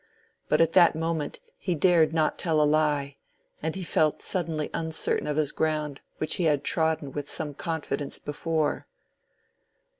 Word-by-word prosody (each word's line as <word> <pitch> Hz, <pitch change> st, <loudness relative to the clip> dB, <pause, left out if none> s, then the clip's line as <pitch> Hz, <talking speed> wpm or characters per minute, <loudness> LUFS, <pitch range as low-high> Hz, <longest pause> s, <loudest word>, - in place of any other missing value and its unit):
But -, -, +4 dB
at 165 Hz, 0 st, +3 dB
that 175 Hz, -3 st, +6 dB
moment 160 Hz, -2 st, -2 dB, 0.2 s
he 180 Hz, -3 st, -1 dB
dared 165 Hz, -1 st, +4 dB
not 160 Hz, -1 st, 0 dB
tell 160 Hz, -3 st, +1 dB
a -, -, +5 dB
lie, 145 Hz, -2 st, +1 dB, 0.4 s
and 160 Hz, +1 st, -2 dB
he 190 Hz, -, -4 dB
felt 155 Hz, -3 st, +1 dB
suddenly 160 Hz, -4 st, -2 dB
uncertain 160 Hz, -1 st, 0 dB
of 150 Hz, 0 st, -1 dB
his 150 Hz, -3 st, +1 dB
ground 150 Hz, -3 st, -1 dB, 0.2 s
which 155 Hz, -, 0 dB
he 175 Hz, -, 0 dB
had 145 Hz, -3 st, +2 dB
trodden 160 Hz, -3 st, 0 dB
with 145 Hz, +1 st, -5 dB
some 150 Hz, -2 st, -3 dB
confidence 145 Hz, -2 st, -3 dB
before. 155 Hz, +1 st, -2 dB
155 Hz, 155 wpm, -27 LUFS, 150-165 Hz, 0.4 s, that